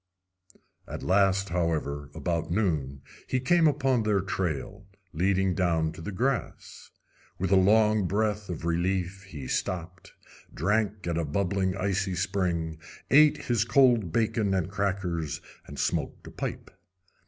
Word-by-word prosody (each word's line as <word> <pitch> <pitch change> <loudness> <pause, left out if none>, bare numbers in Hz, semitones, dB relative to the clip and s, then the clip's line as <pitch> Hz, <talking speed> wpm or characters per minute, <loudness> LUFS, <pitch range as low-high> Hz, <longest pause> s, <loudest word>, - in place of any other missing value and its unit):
At - - -6
last, 95 0 +2
however, 80 -5 -1
about 80 +1 -2
noon, 75 -9 -1 0.2
he 130 - 0
came 165 +6 +4
upon 135 -4 +2
their 105 -2 +2
trail, 95 +1 -3 0.3
leading 95 +2 +1
down 85 -3 +1
to 80 - -10
the 105 - -5
grass. 125 +5 -3 0.5
With 95 +1 -2
a - - +6
long 105 +1 +4
breath 105 +1 -1
of 85 -2 -5
relief, 90 +3 -1
he 75 -8 -8
stopped, 90 +2 -4 0.4
drank 105 -1 0
at 85 -1 -1
a - - 0
bubbling 95 +4 -1
icy 95 0 -1
spring, 85 -4 -1 0.3
ate 150 +2 +6
his 120 -3 +2
cold 120 - +4
bacon 110 -1 +1
and 95 0 -1
crackers, 95 -6 -2 0.3
and - - -9
smoked - - -2
a - - -9
pipe. - - -5
95 Hz, 135 wpm, -27 LUFS, 85-105 Hz, 0.5 s, a